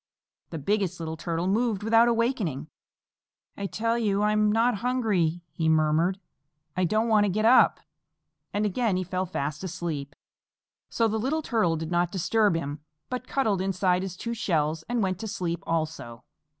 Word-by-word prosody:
The 165 - -5
Biggest 190 +2 -1
Little 160 -1 -4
Turtle 165 +1 -3
moved 210 +1 0
without 225 +2 +5
awakening. 225 - 0 0.9
"I 200 - -3
tell 230 +3 -1
you 205 -2 +1
I'm 210 0 +3
not 230 +1 +2
hungry," 205 -8 0
he 160 -1 0
murmured. 160 +4 +2 0.6
"I 185 - +1
don't 215 +6 +1
want 215 -2 +4
to - - +1
get 215 +3 0
up." 245 +3 +6 0.7
And 205 +1 0
again 210 -1 0
he 185 - -1
fell 185 +1 -2
fast 150 -1 -3
asleep. 160 -6 -4 0.7
So 230 - +1
the 220 0 -1
Slow - - -4
Little 310 +5 0
Turtle 215 -11 +1
did 160 +1 -5
not 175 0 +1
disturb 205 +1 +2
him, 145 -2 -3 0.3
but 250 - -4
cuddled 220 -9 0
inside 185 -1 +1
his 185 -2 -5
two 235 +4 -4
shells 160 -7 0
and 240 -3 0
went 185 -1 -1
to 220 - -5
sleep 175 -5 -3
also. 155 -8 -3
190 Hz, 170 wpm, -26 LUFS, 165-220 Hz, 0.9 s, up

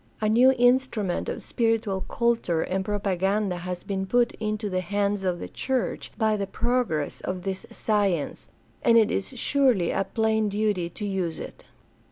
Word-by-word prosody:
A 215 - 0
new 245 +5 +6
instrument 245 -6 +2
of - - -5
spiritual 225 -4 0
culture 230 -9 +1
and 190 +1 -1
propa 200 -1 -1
ganda 195 +1 0
has 180 0 -5
been 190 -1 -3
put 240 +2 +3
into 215 -1 -2
the 185 -2 -1
hands 200 +1 -1
of 180 -2 0
the - - -6
church 260 -2 -2
by 220 -2 +2
the 200 -1 -2
progress 230 - -1
of 185 -1 -4
this 190 -1 -4
science, 200 -8 -1 0.3
and 230 - +5
it 220 -2 +4
is 245 +6 -3
surely 250 -10 +2
a 195 - +1
plain 220 -1 +1
duty 205 -4 0
to 205 +5 -6
use 185 -5 -2
it. - - -9
205 Hz, 170 wpm, -26 LUFS, 190-225 Hz, 0.3 s, new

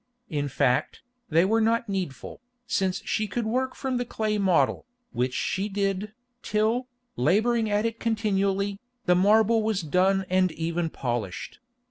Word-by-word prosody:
In 145 -2 -1
fact, 135 -2 0 0.3
they 165 +3 +4
were 225 +3 +2
not 230 +2 +2
needful, 190 - -4 0.2
since 190 -5 -1
she 215 -1 0
could 225 +4 -2
work 255 +4 -1
from 265 -2 -2
the 245 - 0
clay 215 -3 -2
model, 190 +3 +2 0.2
which 125 +2 -1
she 195 +2 -1
did, 200 +1 -2 0.3
till, 220 +4 0 0.3
labouring 220 - +2
at 205 +1 +1
it 230 0 -2
continually, 200 -3 0 0.3
the 180 - +5
marble 220 +4 +4
was 215 -3 0
done 190 +4 +2
and 185 -1 +2
even 165 +1 -2
polished. 110 - -4
200 Hz, 145 wpm, -26 LUFS, 175-220 Hz, 0.3 s, the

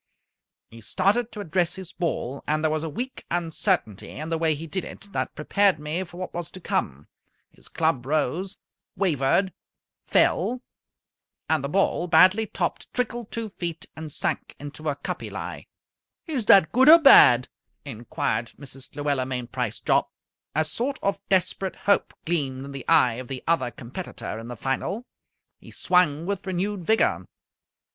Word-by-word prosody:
He 115 0 -12
started 215 - +1
to 210 -2 -6
address 175 -2 0
his 190 -2 -9
ball, 140 -6 -3
and 155 +1 0
there 155 - +2
was 155 0 0
a 160 - -3
weak 250 - -5
uncertainty 170 - -1
in 155 +3 -6
the 165 - 0
way 160 -2 +2
he 155 +3 -7
did 170 +4 -3
it 200 - -10
that - - -2
prepared 195 +4 +2
me 150 +5 -3
for 175 -1 -13
what 185 - -6
was 175 -1 -4
to 185 - -10
come. 70 - -2 0.4
His - - -13
club 160 -6 0
rose, 155 +6 -1 0.4
wavered, 180 +1 +1 0.5
fell; 250 +1 +2 0.8
and 155 -3 +1
the 140 - -2
ball, 180 0 +1
badly 185 +5 +5
topped, 175 -3 -3
trickled 240 -2 -2
two 230 -1 -4
feet 170 -4 -5
and 155 -1 -7
sank - - -3
into 145 +2 -5
a 145 - -1
cuppy 145 - -5
lie. - - -7 0.6
"Is 275 -9 -3
that 190 -7 +6
good 260 +5 +5
or 330 - +12
bad?" 125 - +8 0.4
inquired 115 -2 -3
Mrs. 135 -2 -8
Luella 145 -3 -1
Mainprice 125 -3 -3
Jopp. - - +3 0.5
A 155 +1 +2
sort 245 - -2
of 200 - 0
desperate 190 0 +1
hope 200 - +1
gleamed 140 -6 -1
in 140 - -8
the 135 -2 -8
eye 120 -1 +4
of 130 - -10
the 130 -1 -5
other 165 -6 +2
competitor 120 - -7
in 115 - -8
the 120 -1 -7
final. 190 - -2 0.5
He - - -14
swung 170 -4 +2
with 200 0 -3
renewed 190 0 -2
vigour. 220 0 +2
165 Hz, 165 wpm, -25 LUFS, 140-195 Hz, 0.8 s, or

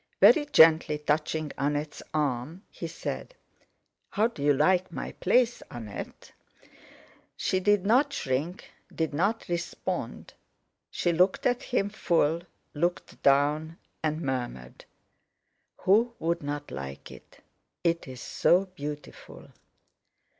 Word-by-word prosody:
Very 295 -2 +6
gently 160 - +6
touching 150 +1 -1
Annette's 145 +1 -2
arm, 150 - -2
he - - -6
said: - - -6 0.7
"How 210 - +1
do 230 -11 -3
you 145 +1 +4
like 175 +6 +2
my - - -5
place, 240 +5 +2
Annette?" 110 -4 -8 1.1
She 185 - 0
did 200 0 +2
not 260 +7 +4
shrink, 155 - -3 0.2
did 160 -2 -2
not 200 +9 0
respond; 175 -1 -4 0.6
she 175 - 0
looked 180 +3 +2
at 245 -1 +2
him 205 -5 0
full, 170 -5 +1 0.3
looked 175 +4 -2
down, 150 +4 +2 0.2
and 155 0 -1
murmured: 120 - -4 1.0
"Who 230 +5 +3
would 170 +1 -1
not 145 0 -5
like 70 0 -7
it? - - -15 0.4
It 170 -2 0
is 130 -2 -9
so 180 +3 +3
beautiful!" 150 -5 -9
160 Hz, 115 wpm, -28 LUFS, 145-190 Hz, 1.1 s, Very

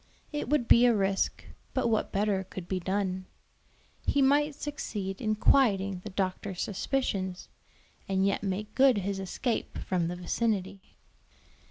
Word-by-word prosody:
It 295 -4 -3
would 280 -5 +2
be 240 +1 +7
a 235 - +4
risk, 195 -1 0 0.3
but - - +2
what 220 -2 0
better 200 -1 +1
could 185 -1 -8
be 185 0 -1
done? 185 0 -2 0.8
He 285 - +1
might 290 +2 +3
succeed 210 -10 -4
in 215 -2 +1
quieting 200 -6 +3
the 215 - -6
doctor's 190 -1 -3
suspicions, 195 -4 -2 0.6
and 190 0 +2
yet 200 - +1
make 205 +2 -3
good 265 -3 +5
his 195 0 -2
escape 220 +5 -2
from 180 -3 -1
the 175 - -3
vicinity. 195 +1 -2
200 Hz, 145 wpm, -29 LUFS, 190-235 Hz, 0.8 s, be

